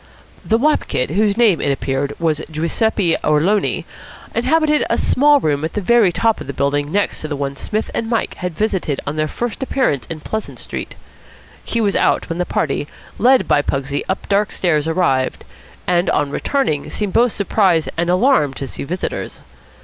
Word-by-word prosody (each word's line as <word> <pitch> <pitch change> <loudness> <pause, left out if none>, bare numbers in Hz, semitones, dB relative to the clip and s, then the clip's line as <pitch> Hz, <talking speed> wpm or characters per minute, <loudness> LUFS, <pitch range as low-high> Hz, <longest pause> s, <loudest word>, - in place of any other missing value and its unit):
The 225 - +2
wop 300 +6 +1
kid, 125 - -1
whose 205 +3 +1
name, 220 -8 +4
it 140 - +1
appeared, 135 +1 -2
was 160 -2 0
Giuseppe 170 +3 +1
Orloni, 165 +8 +1 0.5
inhabited 300 +5 +2
a - - +1
small 290 +2 +4
room 150 - 0
at 160 - -3
the - - -1
very 215 -1 +4
top 225 +5 +1
of - - -8
the 140 - -4
building 145 +2 0
next 205 +2 0
to 155 - -4
the 150 - -3
one 140 -1 -3
Psmith 215 +9 -3
and 225 - -2
Mike 230 -2 0
had 180 -3 -5
visited 190 -9 -1
on 145 - -3
their 155 0 0
first 240 - -4
appearance 260 - 0
in 165 -2 -6
Pleasant 220 +7 -5
Street. - - -6 0.7
He 230 - -2
was 205 -2 +1
out - - +1
when 165 +1 -3
the 180 - -1
party, 145 0 -1 0.3
led 255 +3 +4
by 145 - +3
Pugsy 140 0 -2
up 190 - -2
dark 205 0 +1
stairs, 155 -4 0
arrived; 160 -7 0 0.4
and, 175 0 +2
on 140 - 0
returning, 155 - -1
seemed 205 -3 -3
both 240 0 +4
surprised 190 -5 +2
and 170 +1 -1
alarmed 180 - +3
to 135 - -5
see - - -7
visitors. 180 +6 -4
180 Hz, 185 wpm, -18 LUFS, 150-220 Hz, 0.7 s, name